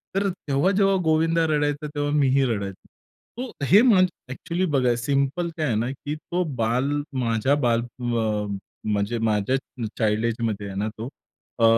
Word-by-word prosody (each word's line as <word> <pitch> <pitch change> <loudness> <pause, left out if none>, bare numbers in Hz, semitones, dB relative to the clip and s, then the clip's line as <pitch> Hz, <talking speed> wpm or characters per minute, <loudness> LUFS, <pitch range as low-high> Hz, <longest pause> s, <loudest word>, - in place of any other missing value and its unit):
तर 200 0 +2
तेव्हा, 175 -1 0
जेव्हा 195 0 +3
गोविंदा 165 +1 +3
रडायचा, 150 -1 0
तेव्हा 145 0 -2
मी 145 -2 +3
ही 135 +1 +3
रडायचो. 100 -5 -3 0.5
तो 245 - -5
हे 200 - +7
माझं 195 -7 +5 0.2
एक्चुअली 170 +7 -2
बघा, 125 -3 +3
सिंपल 140 +7 0
काय 155 - 0
आहे 115 - +1
ना, 115 +3 0
की 145 +2 -5
तो 175 +3 -2 0.2
बाल 125 +5 +1 0.3
माझ्या 115 +5 +2
बाल, 115 -1 +3
अ, 115 -3 -2 0.4
म्हणजे 105 +2 0
माझ्या 105 +5 +1 0.4
चाइल्ड 110 0 +1
एजमध्ये 110 -3 -2
आहे 95 - -7
ना, 105 - -1
तो 115 +4 -5 0.5
अ, - - +2
135 Hz, 165 wpm, -24 LUFS, 115-160 Hz, 0.5 s, हे